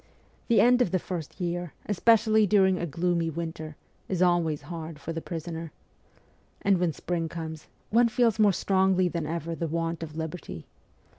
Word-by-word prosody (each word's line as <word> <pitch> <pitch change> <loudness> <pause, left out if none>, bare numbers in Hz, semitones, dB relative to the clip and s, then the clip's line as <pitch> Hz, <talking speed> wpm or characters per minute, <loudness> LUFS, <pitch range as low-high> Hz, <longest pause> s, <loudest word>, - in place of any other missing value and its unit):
The 235 - +4
end 245 +1 +5
of 245 - +3
the 185 - +1
first 175 -3 -6
year, 175 -2 -3
especially 220 +1 +4
during 190 -2 +4
a 175 - -2
gloomy 170 +2 0
winter, 160 -1 -5 0.3
is 185 - -1
always 175 -4 +2
hard 165 -2 -7
for 155 +3 -6
the 165 - -4
prisoner. 165 -1 -6 0.9
And 195 -2 +3
when 175 -2 +1
spring 165 +1 -3
comes, 160 -2 -7 0.2
one 235 +2 +5
feels 230 -2 +2
more 210 -2 +6
strongly 190 -1 +2
than 165 -2 -3
ever 165 +1 -3
the 165 0 -3
want 165 +1 -2
of 155 -1 -7
liberty. 160 - -6
170 Hz, 165 wpm, -27 LUFS, 165-190 Hz, 0.9 s, more